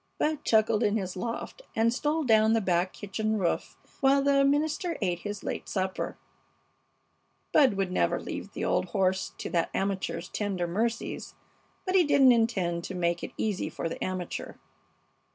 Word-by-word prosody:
Bud 305 -1 0
chuckled 220 -1 +3
in 210 +1 +2
his 190 -3 -4
loft 230 - -5
and 230 +1 +3
stole 300 +5 0
down 220 -3 +4
the 225 - +4
back 185 -2 +1
kitchen 215 +2 -2
roof 180 -4 -1 0.2
while 275 +1 +4
the 275 0 +4
minister 305 +4 +1
ate 180 -4 0
his 205 +2 -6
late - - -4
supper. 190 -1 -2 1.4
Bud 265 -8 +5
would 195 -2 -1
never - - +1
leave - - -6
the - - -3
old - - +1
horse 190 -2 0
to - - -5
that 170 -2 +1
amateur's 190 -3 -2
tender 195 -4 -2
mercies, 225 +7 -2 0.5
but 370 - -1
he 375 -2 +6
didn't 275 -4 +6
intend 195 -8 +1
to 190 - -5
make 170 -1 0
it - - -6
easy 205 -7 -1
for 165 +1 -4
the 165 - -5
amateur. 185 -2 -4
210 Hz, 165 wpm, -28 LUFS, 185-245 Hz, 1.4 s, he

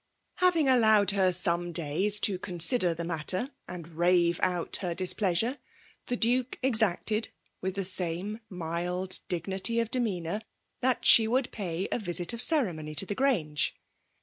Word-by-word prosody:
Having 350 -5 +2
allowed 220 -6 +4
her 190 -2 +2
some 175 -1 0
days 170 +6 +2
to 190 -3 +2
consider 180 0 +1
the 170 - -5
matter 175 - -2 0.2
and 170 -3 -8
rave 170 +1 +1
out 180 -2 0
her 175 -3 -4
displeasure^ 195 +7 0 0.5
the 245 - -1
Duke 245 +3 0
exacted, 220 -2 +2 0.3
with 190 0 -3
the 195 -1 -2
same 185 +3 -1
mild 180 +1 -4
dignity 190 +6 -1
of 230 -1 -2
demeanour, 205 -6 -2 0.4
that 255 0 0
she 225 -1 +7
would 250 +3 0
pay 185 -3 -4
a - - -1
visit 175 -1 0
of 235 - -3
cere 270 - +4
mony 155 -1 -8
to 195 - -1
the 205 - -4
Grange. 195 - 0
185 Hz, 150 wpm, -28 LUFS, 175-225 Hz, 0.5 s, she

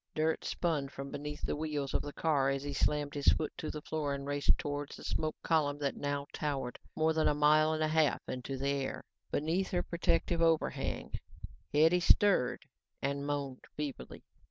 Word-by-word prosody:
Dirt 155 +1 +1
spun 155 -6 -1
from 140 0 -7
beneath 150 +1 -5
the - - 0
wheels 150 -3 -2
of - - +2
the 145 - -6
car 145 -3 +2
as 135 0 -1
he 145 0 -4
slammed 145 +1 +1
his 145 -1 -3
foot 155 - +3
to 155 - -3
the 150 -1 -6
floor 145 -3 -1
and 140 0 -6
raced 145 0 +2
towards 145 0 -4
the - - -11
smoke 155 0 -1
column 150 -3 +2
that 140 -2 -1
now 145 0 -2
towered 140 -5 -3 0.2
more 160 0 +2
than 160 0 +2
a 150 - +3
mile 155 +1 +5
and 155 0 0
a - - +3
half 155 -3 +3
into 130 +1 -4
the 140 +1 -1
air. 140 -1 -2 0.3
Beneath 165 +6 0
her 175 -1 0
protective 170 0 +1
overhang, 165 -1 +1 0.6
Hetty 160 +4 +5
stirred 175 -9 +3 0.3
and 140 +1 -2
moaned 140 -3 -3
feebly. 150 -3 -5
145 Hz, 185 wpm, -33 LUFS, 140-155 Hz, 0.6 s, mile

